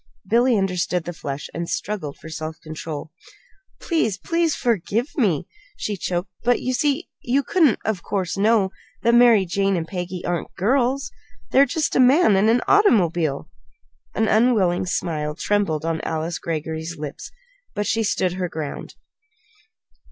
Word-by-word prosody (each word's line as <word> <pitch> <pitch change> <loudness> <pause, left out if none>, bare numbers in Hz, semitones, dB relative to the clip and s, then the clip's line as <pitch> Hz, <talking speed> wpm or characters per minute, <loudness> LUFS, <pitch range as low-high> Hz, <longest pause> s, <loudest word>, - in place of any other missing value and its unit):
Billy 235 +3 +3
understood 180 -2 0
the 175 - -5
flush, 140 -2 -5
and 170 0 -4
struggled 180 -9 -3
for - - -12
self 160 0 -6
control. 155 -1 -7 0.7
"Please 225 - 0
please, 335 - 0
forgive 230 - -1
me!" 190 - +1 0.3
she 210 - -3
choked. 180 0 -3
"But 245 0 +3
you 255 - -2
see 290 +5 0
you 270 +3 +1
couldn't, 305 -2 +3
of 215 -4 -1
course, 185 -4 -2
know 205 -1 +3 0.3
that 235 - +4
Mary 235 -5 +6
Jane 195 +2 0
and 165 -1 -3
Peggy 180 -1 -5
aren't 175 -2 -3
girls. 260 +6 +1 0.4
They're 275 +1 +5
just 300 +2 -1
a - - +3
man 255 - +5
and 200 +3 +3
an 240 +2 +3
automobile!" 175 - +3 0.7
An 220 - +2
unwilling 215 -7 +3
smile 150 -4 -2
trembled 170 -5 0
on 165 -1 -1
Alice 160 +1 -3
Greggory's 160 +1 -4
lips; 150 -1 -7 0.5
but 205 0 -1
she 225 - +1
still 195 -3 +1
stood 180 +2 -7
her 180 -1 -1
ground. 155 -3 -6
195 Hz, 150 wpm, -22 LUFS, 165-240 Hz, 0.7 s, Mary